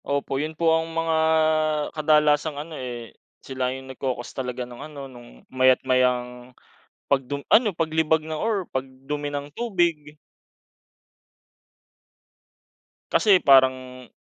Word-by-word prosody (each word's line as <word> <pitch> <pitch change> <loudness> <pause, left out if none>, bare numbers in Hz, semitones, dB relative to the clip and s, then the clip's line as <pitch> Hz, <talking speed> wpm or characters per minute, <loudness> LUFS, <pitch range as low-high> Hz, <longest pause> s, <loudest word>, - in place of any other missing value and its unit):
Opo, 140 -1 -2
yun 155 +1 -5
po 165 0 +3
ang 160 0 0
mga 165 0 0 0.8
kadalasang 150 -1 +2
ano, 155 +3 -7
eh, 120 -5 -7 0.3
sila 130 -1 -2
yung 130 +1 -6
nagko-cause 125 -2 -4
talaga 125 -1 -4
nung 120 0 -12
ano, 145 -2 -8
nung 120 -3 -15
maya't 130 0 +4
mayang 125 -1 0 0.5
pagdu 140 +1 -1
ano 220 -1 +5
paglibag 160 -1 +1
ng 160 - -6
or 200 +4 -1
pag 130 - -1 0.2
dumi 145 +1 -3
ng 145 0 -6
tubig. 170 -8 -1 3.0
Kasi 200 -5 +4
parang 130 -2 +3
140 Hz, 120 wpm, -24 LUFS, 130-160 Hz, 3.0 s, ano